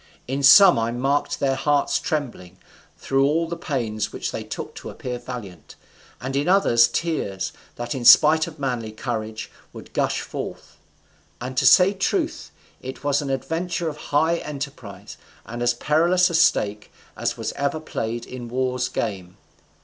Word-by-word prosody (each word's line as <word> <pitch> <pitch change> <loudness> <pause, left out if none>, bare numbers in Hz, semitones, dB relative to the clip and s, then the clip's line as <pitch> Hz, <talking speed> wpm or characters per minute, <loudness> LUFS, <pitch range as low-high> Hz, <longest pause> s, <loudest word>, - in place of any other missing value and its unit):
In 135 +2 -2
some 175 - +8
I 115 +1 -1
marked 135 +4 -1
their 135 -1 +1
hearts 145 +1 +1
trembling, 115 - -4 0.4
through 135 0 +1
all 160 +4 +1
the 170 - -4
pains 115 -10 -3
which - - -4
they - - -5
took - - -7
to - - -9
appear 125 -1 -6
valiant, 105 -10 -9 0.4
and 135 +2 -5
in 140 +3 0
others 120 -12 +5
tears, 115 - -3 0.2
that 120 0 -4
in 130 - -5
spite 155 +5 +7
of 160 -1 -10
manly 125 -6 -3
courage 110 -1 -5 0.2
would - - -12
gush - - 0
forth. - - -7 0.6
And 125 +2 -6
to - - +3
say 190 +1 +6
truth, 315 - -2 0.3
it 130 +2 -8
was 145 0 +1
an 140 - -5
adventure 165 +5 -2
of 150 - -8
high 160 +4 +2
enterprise, 140 - -8 0.3
and 120 +1 -7
as 120 0 +2
perilous 170 +7 +2
a - - -5
stake 105 -10 +1 0.2
as - - -2
was - - -3
ever 140 +3 -2
played 115 -6 -4
in 125 -2 -8
war's 125 0 -1
game. 95 -5 -4
135 Hz, 160 wpm, -23 LUFS, 120-155 Hz, 0.6 s, some